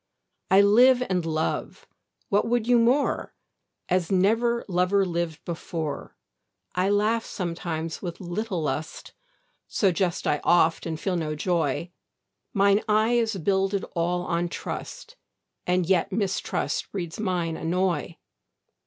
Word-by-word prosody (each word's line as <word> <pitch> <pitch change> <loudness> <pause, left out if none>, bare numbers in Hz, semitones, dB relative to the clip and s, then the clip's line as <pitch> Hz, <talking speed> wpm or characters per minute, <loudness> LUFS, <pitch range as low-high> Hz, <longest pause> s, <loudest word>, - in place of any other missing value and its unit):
I 195 +1 +7
live 245 +5 +6
and 180 -2 +1
love 160 0 -2 0.4
(what 205 +2 +2
would 235 -1 0
you 245 -1 +5
more?) 250 +5 +1 0.5
As 180 -1 0
never 230 +5 +2
lover 185 +1 +2
lived 170 -3 -3
before. 165 -3 -5 0.6
I 185 +2 +1
laugh 215 +3 +2
sometimes 165 -3 -4
with 175 -3 -5
little 185 0 -3
lust, 150 +2 -4 0.5
So 195 -3 +2
jest 175 0 -1
I 150 - +1
oft 170 -1 +3
and 160 -1 -4
feel 190 +1 -1
no 155 -2 -2
joy; 170 0 -1 0.6
Mine 200 -1 +3
eye 215 +2 +3
is 230 -3 +1
builded 195 +2 0
all 175 +1 0
on 170 +1 -1
trust, 480 - -7 0.5
And 180 0 +2
yet 180 -1 +2
mistrust 195 -1 -2
breeds 175 -3 -5
mine 180 -5 -1
annoy. 170 -1 -1
185 Hz, 125 wpm, -26 LUFS, 170-205 Hz, 0.6 s, I